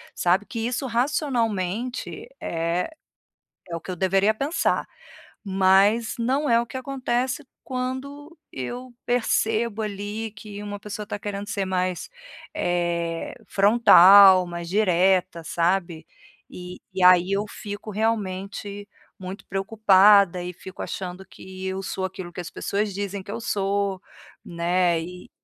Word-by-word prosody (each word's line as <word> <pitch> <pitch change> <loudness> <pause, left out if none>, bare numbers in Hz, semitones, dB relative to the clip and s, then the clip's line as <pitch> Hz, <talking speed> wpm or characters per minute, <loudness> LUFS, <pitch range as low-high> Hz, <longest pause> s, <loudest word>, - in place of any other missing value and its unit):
sabe, 180 +4 +1
que 230 -1 -4
isso 250 +2 -2
racionalmente 235 - -1
é 170 - -1 0.8
é 170 - -3
o - - -6
que - - -8
eu 180 - -4
deveria 195 +3 +2
pensar, 280 +9 -1 0.6
mas 195 +4 +3
não 265 +5 0
é 230 0 +5
o 235 - 0
que - - -14
acontece 260 +1 -2 0.2
quando 270 +4 -5 0.2
eu 245 - -6
percebo 225 -2 0
ali 210 +2 -4
que 205 0 -9
uma 205 -1 -6
pessoa 210 +1 -6
está 205 - -5
querendo 205 0 -5
ser 200 -2 -2
mais, 185 - -2 0.5
eh 170 -1 -1
frontal, 195 -3 +7
mais 170 0 -6
direta, 185 -3 +2
sabe, 170 -2 -1 0.4
e 180 0 -9 0.2
e 190 - -2
aí 180 +1 +6
eu 200 +1 +1
fico 205 +1 -7
realmente 205 -1 -3 0.3
muito 190 +1 -8
preocupada 195 -2 +4
e 180 0 -6
fico 190 +2 -11
achando 185 0 -6
que 190 0 -9
eu 190 +1 -3
sou 190 0 -4
aquilo 185 -2 -8
que 180 - -6
as 170 - -7
pessoas 205 0 -2
dizem 200 -1 -4
que 200 - -11
eu 230 - -4
sou, 200 -2 -1 0.4
né 175 0 +1
e 180 +1 -10
200 Hz, 135 wpm, -24 LUFS, 185-225 Hz, 0.8 s, frontal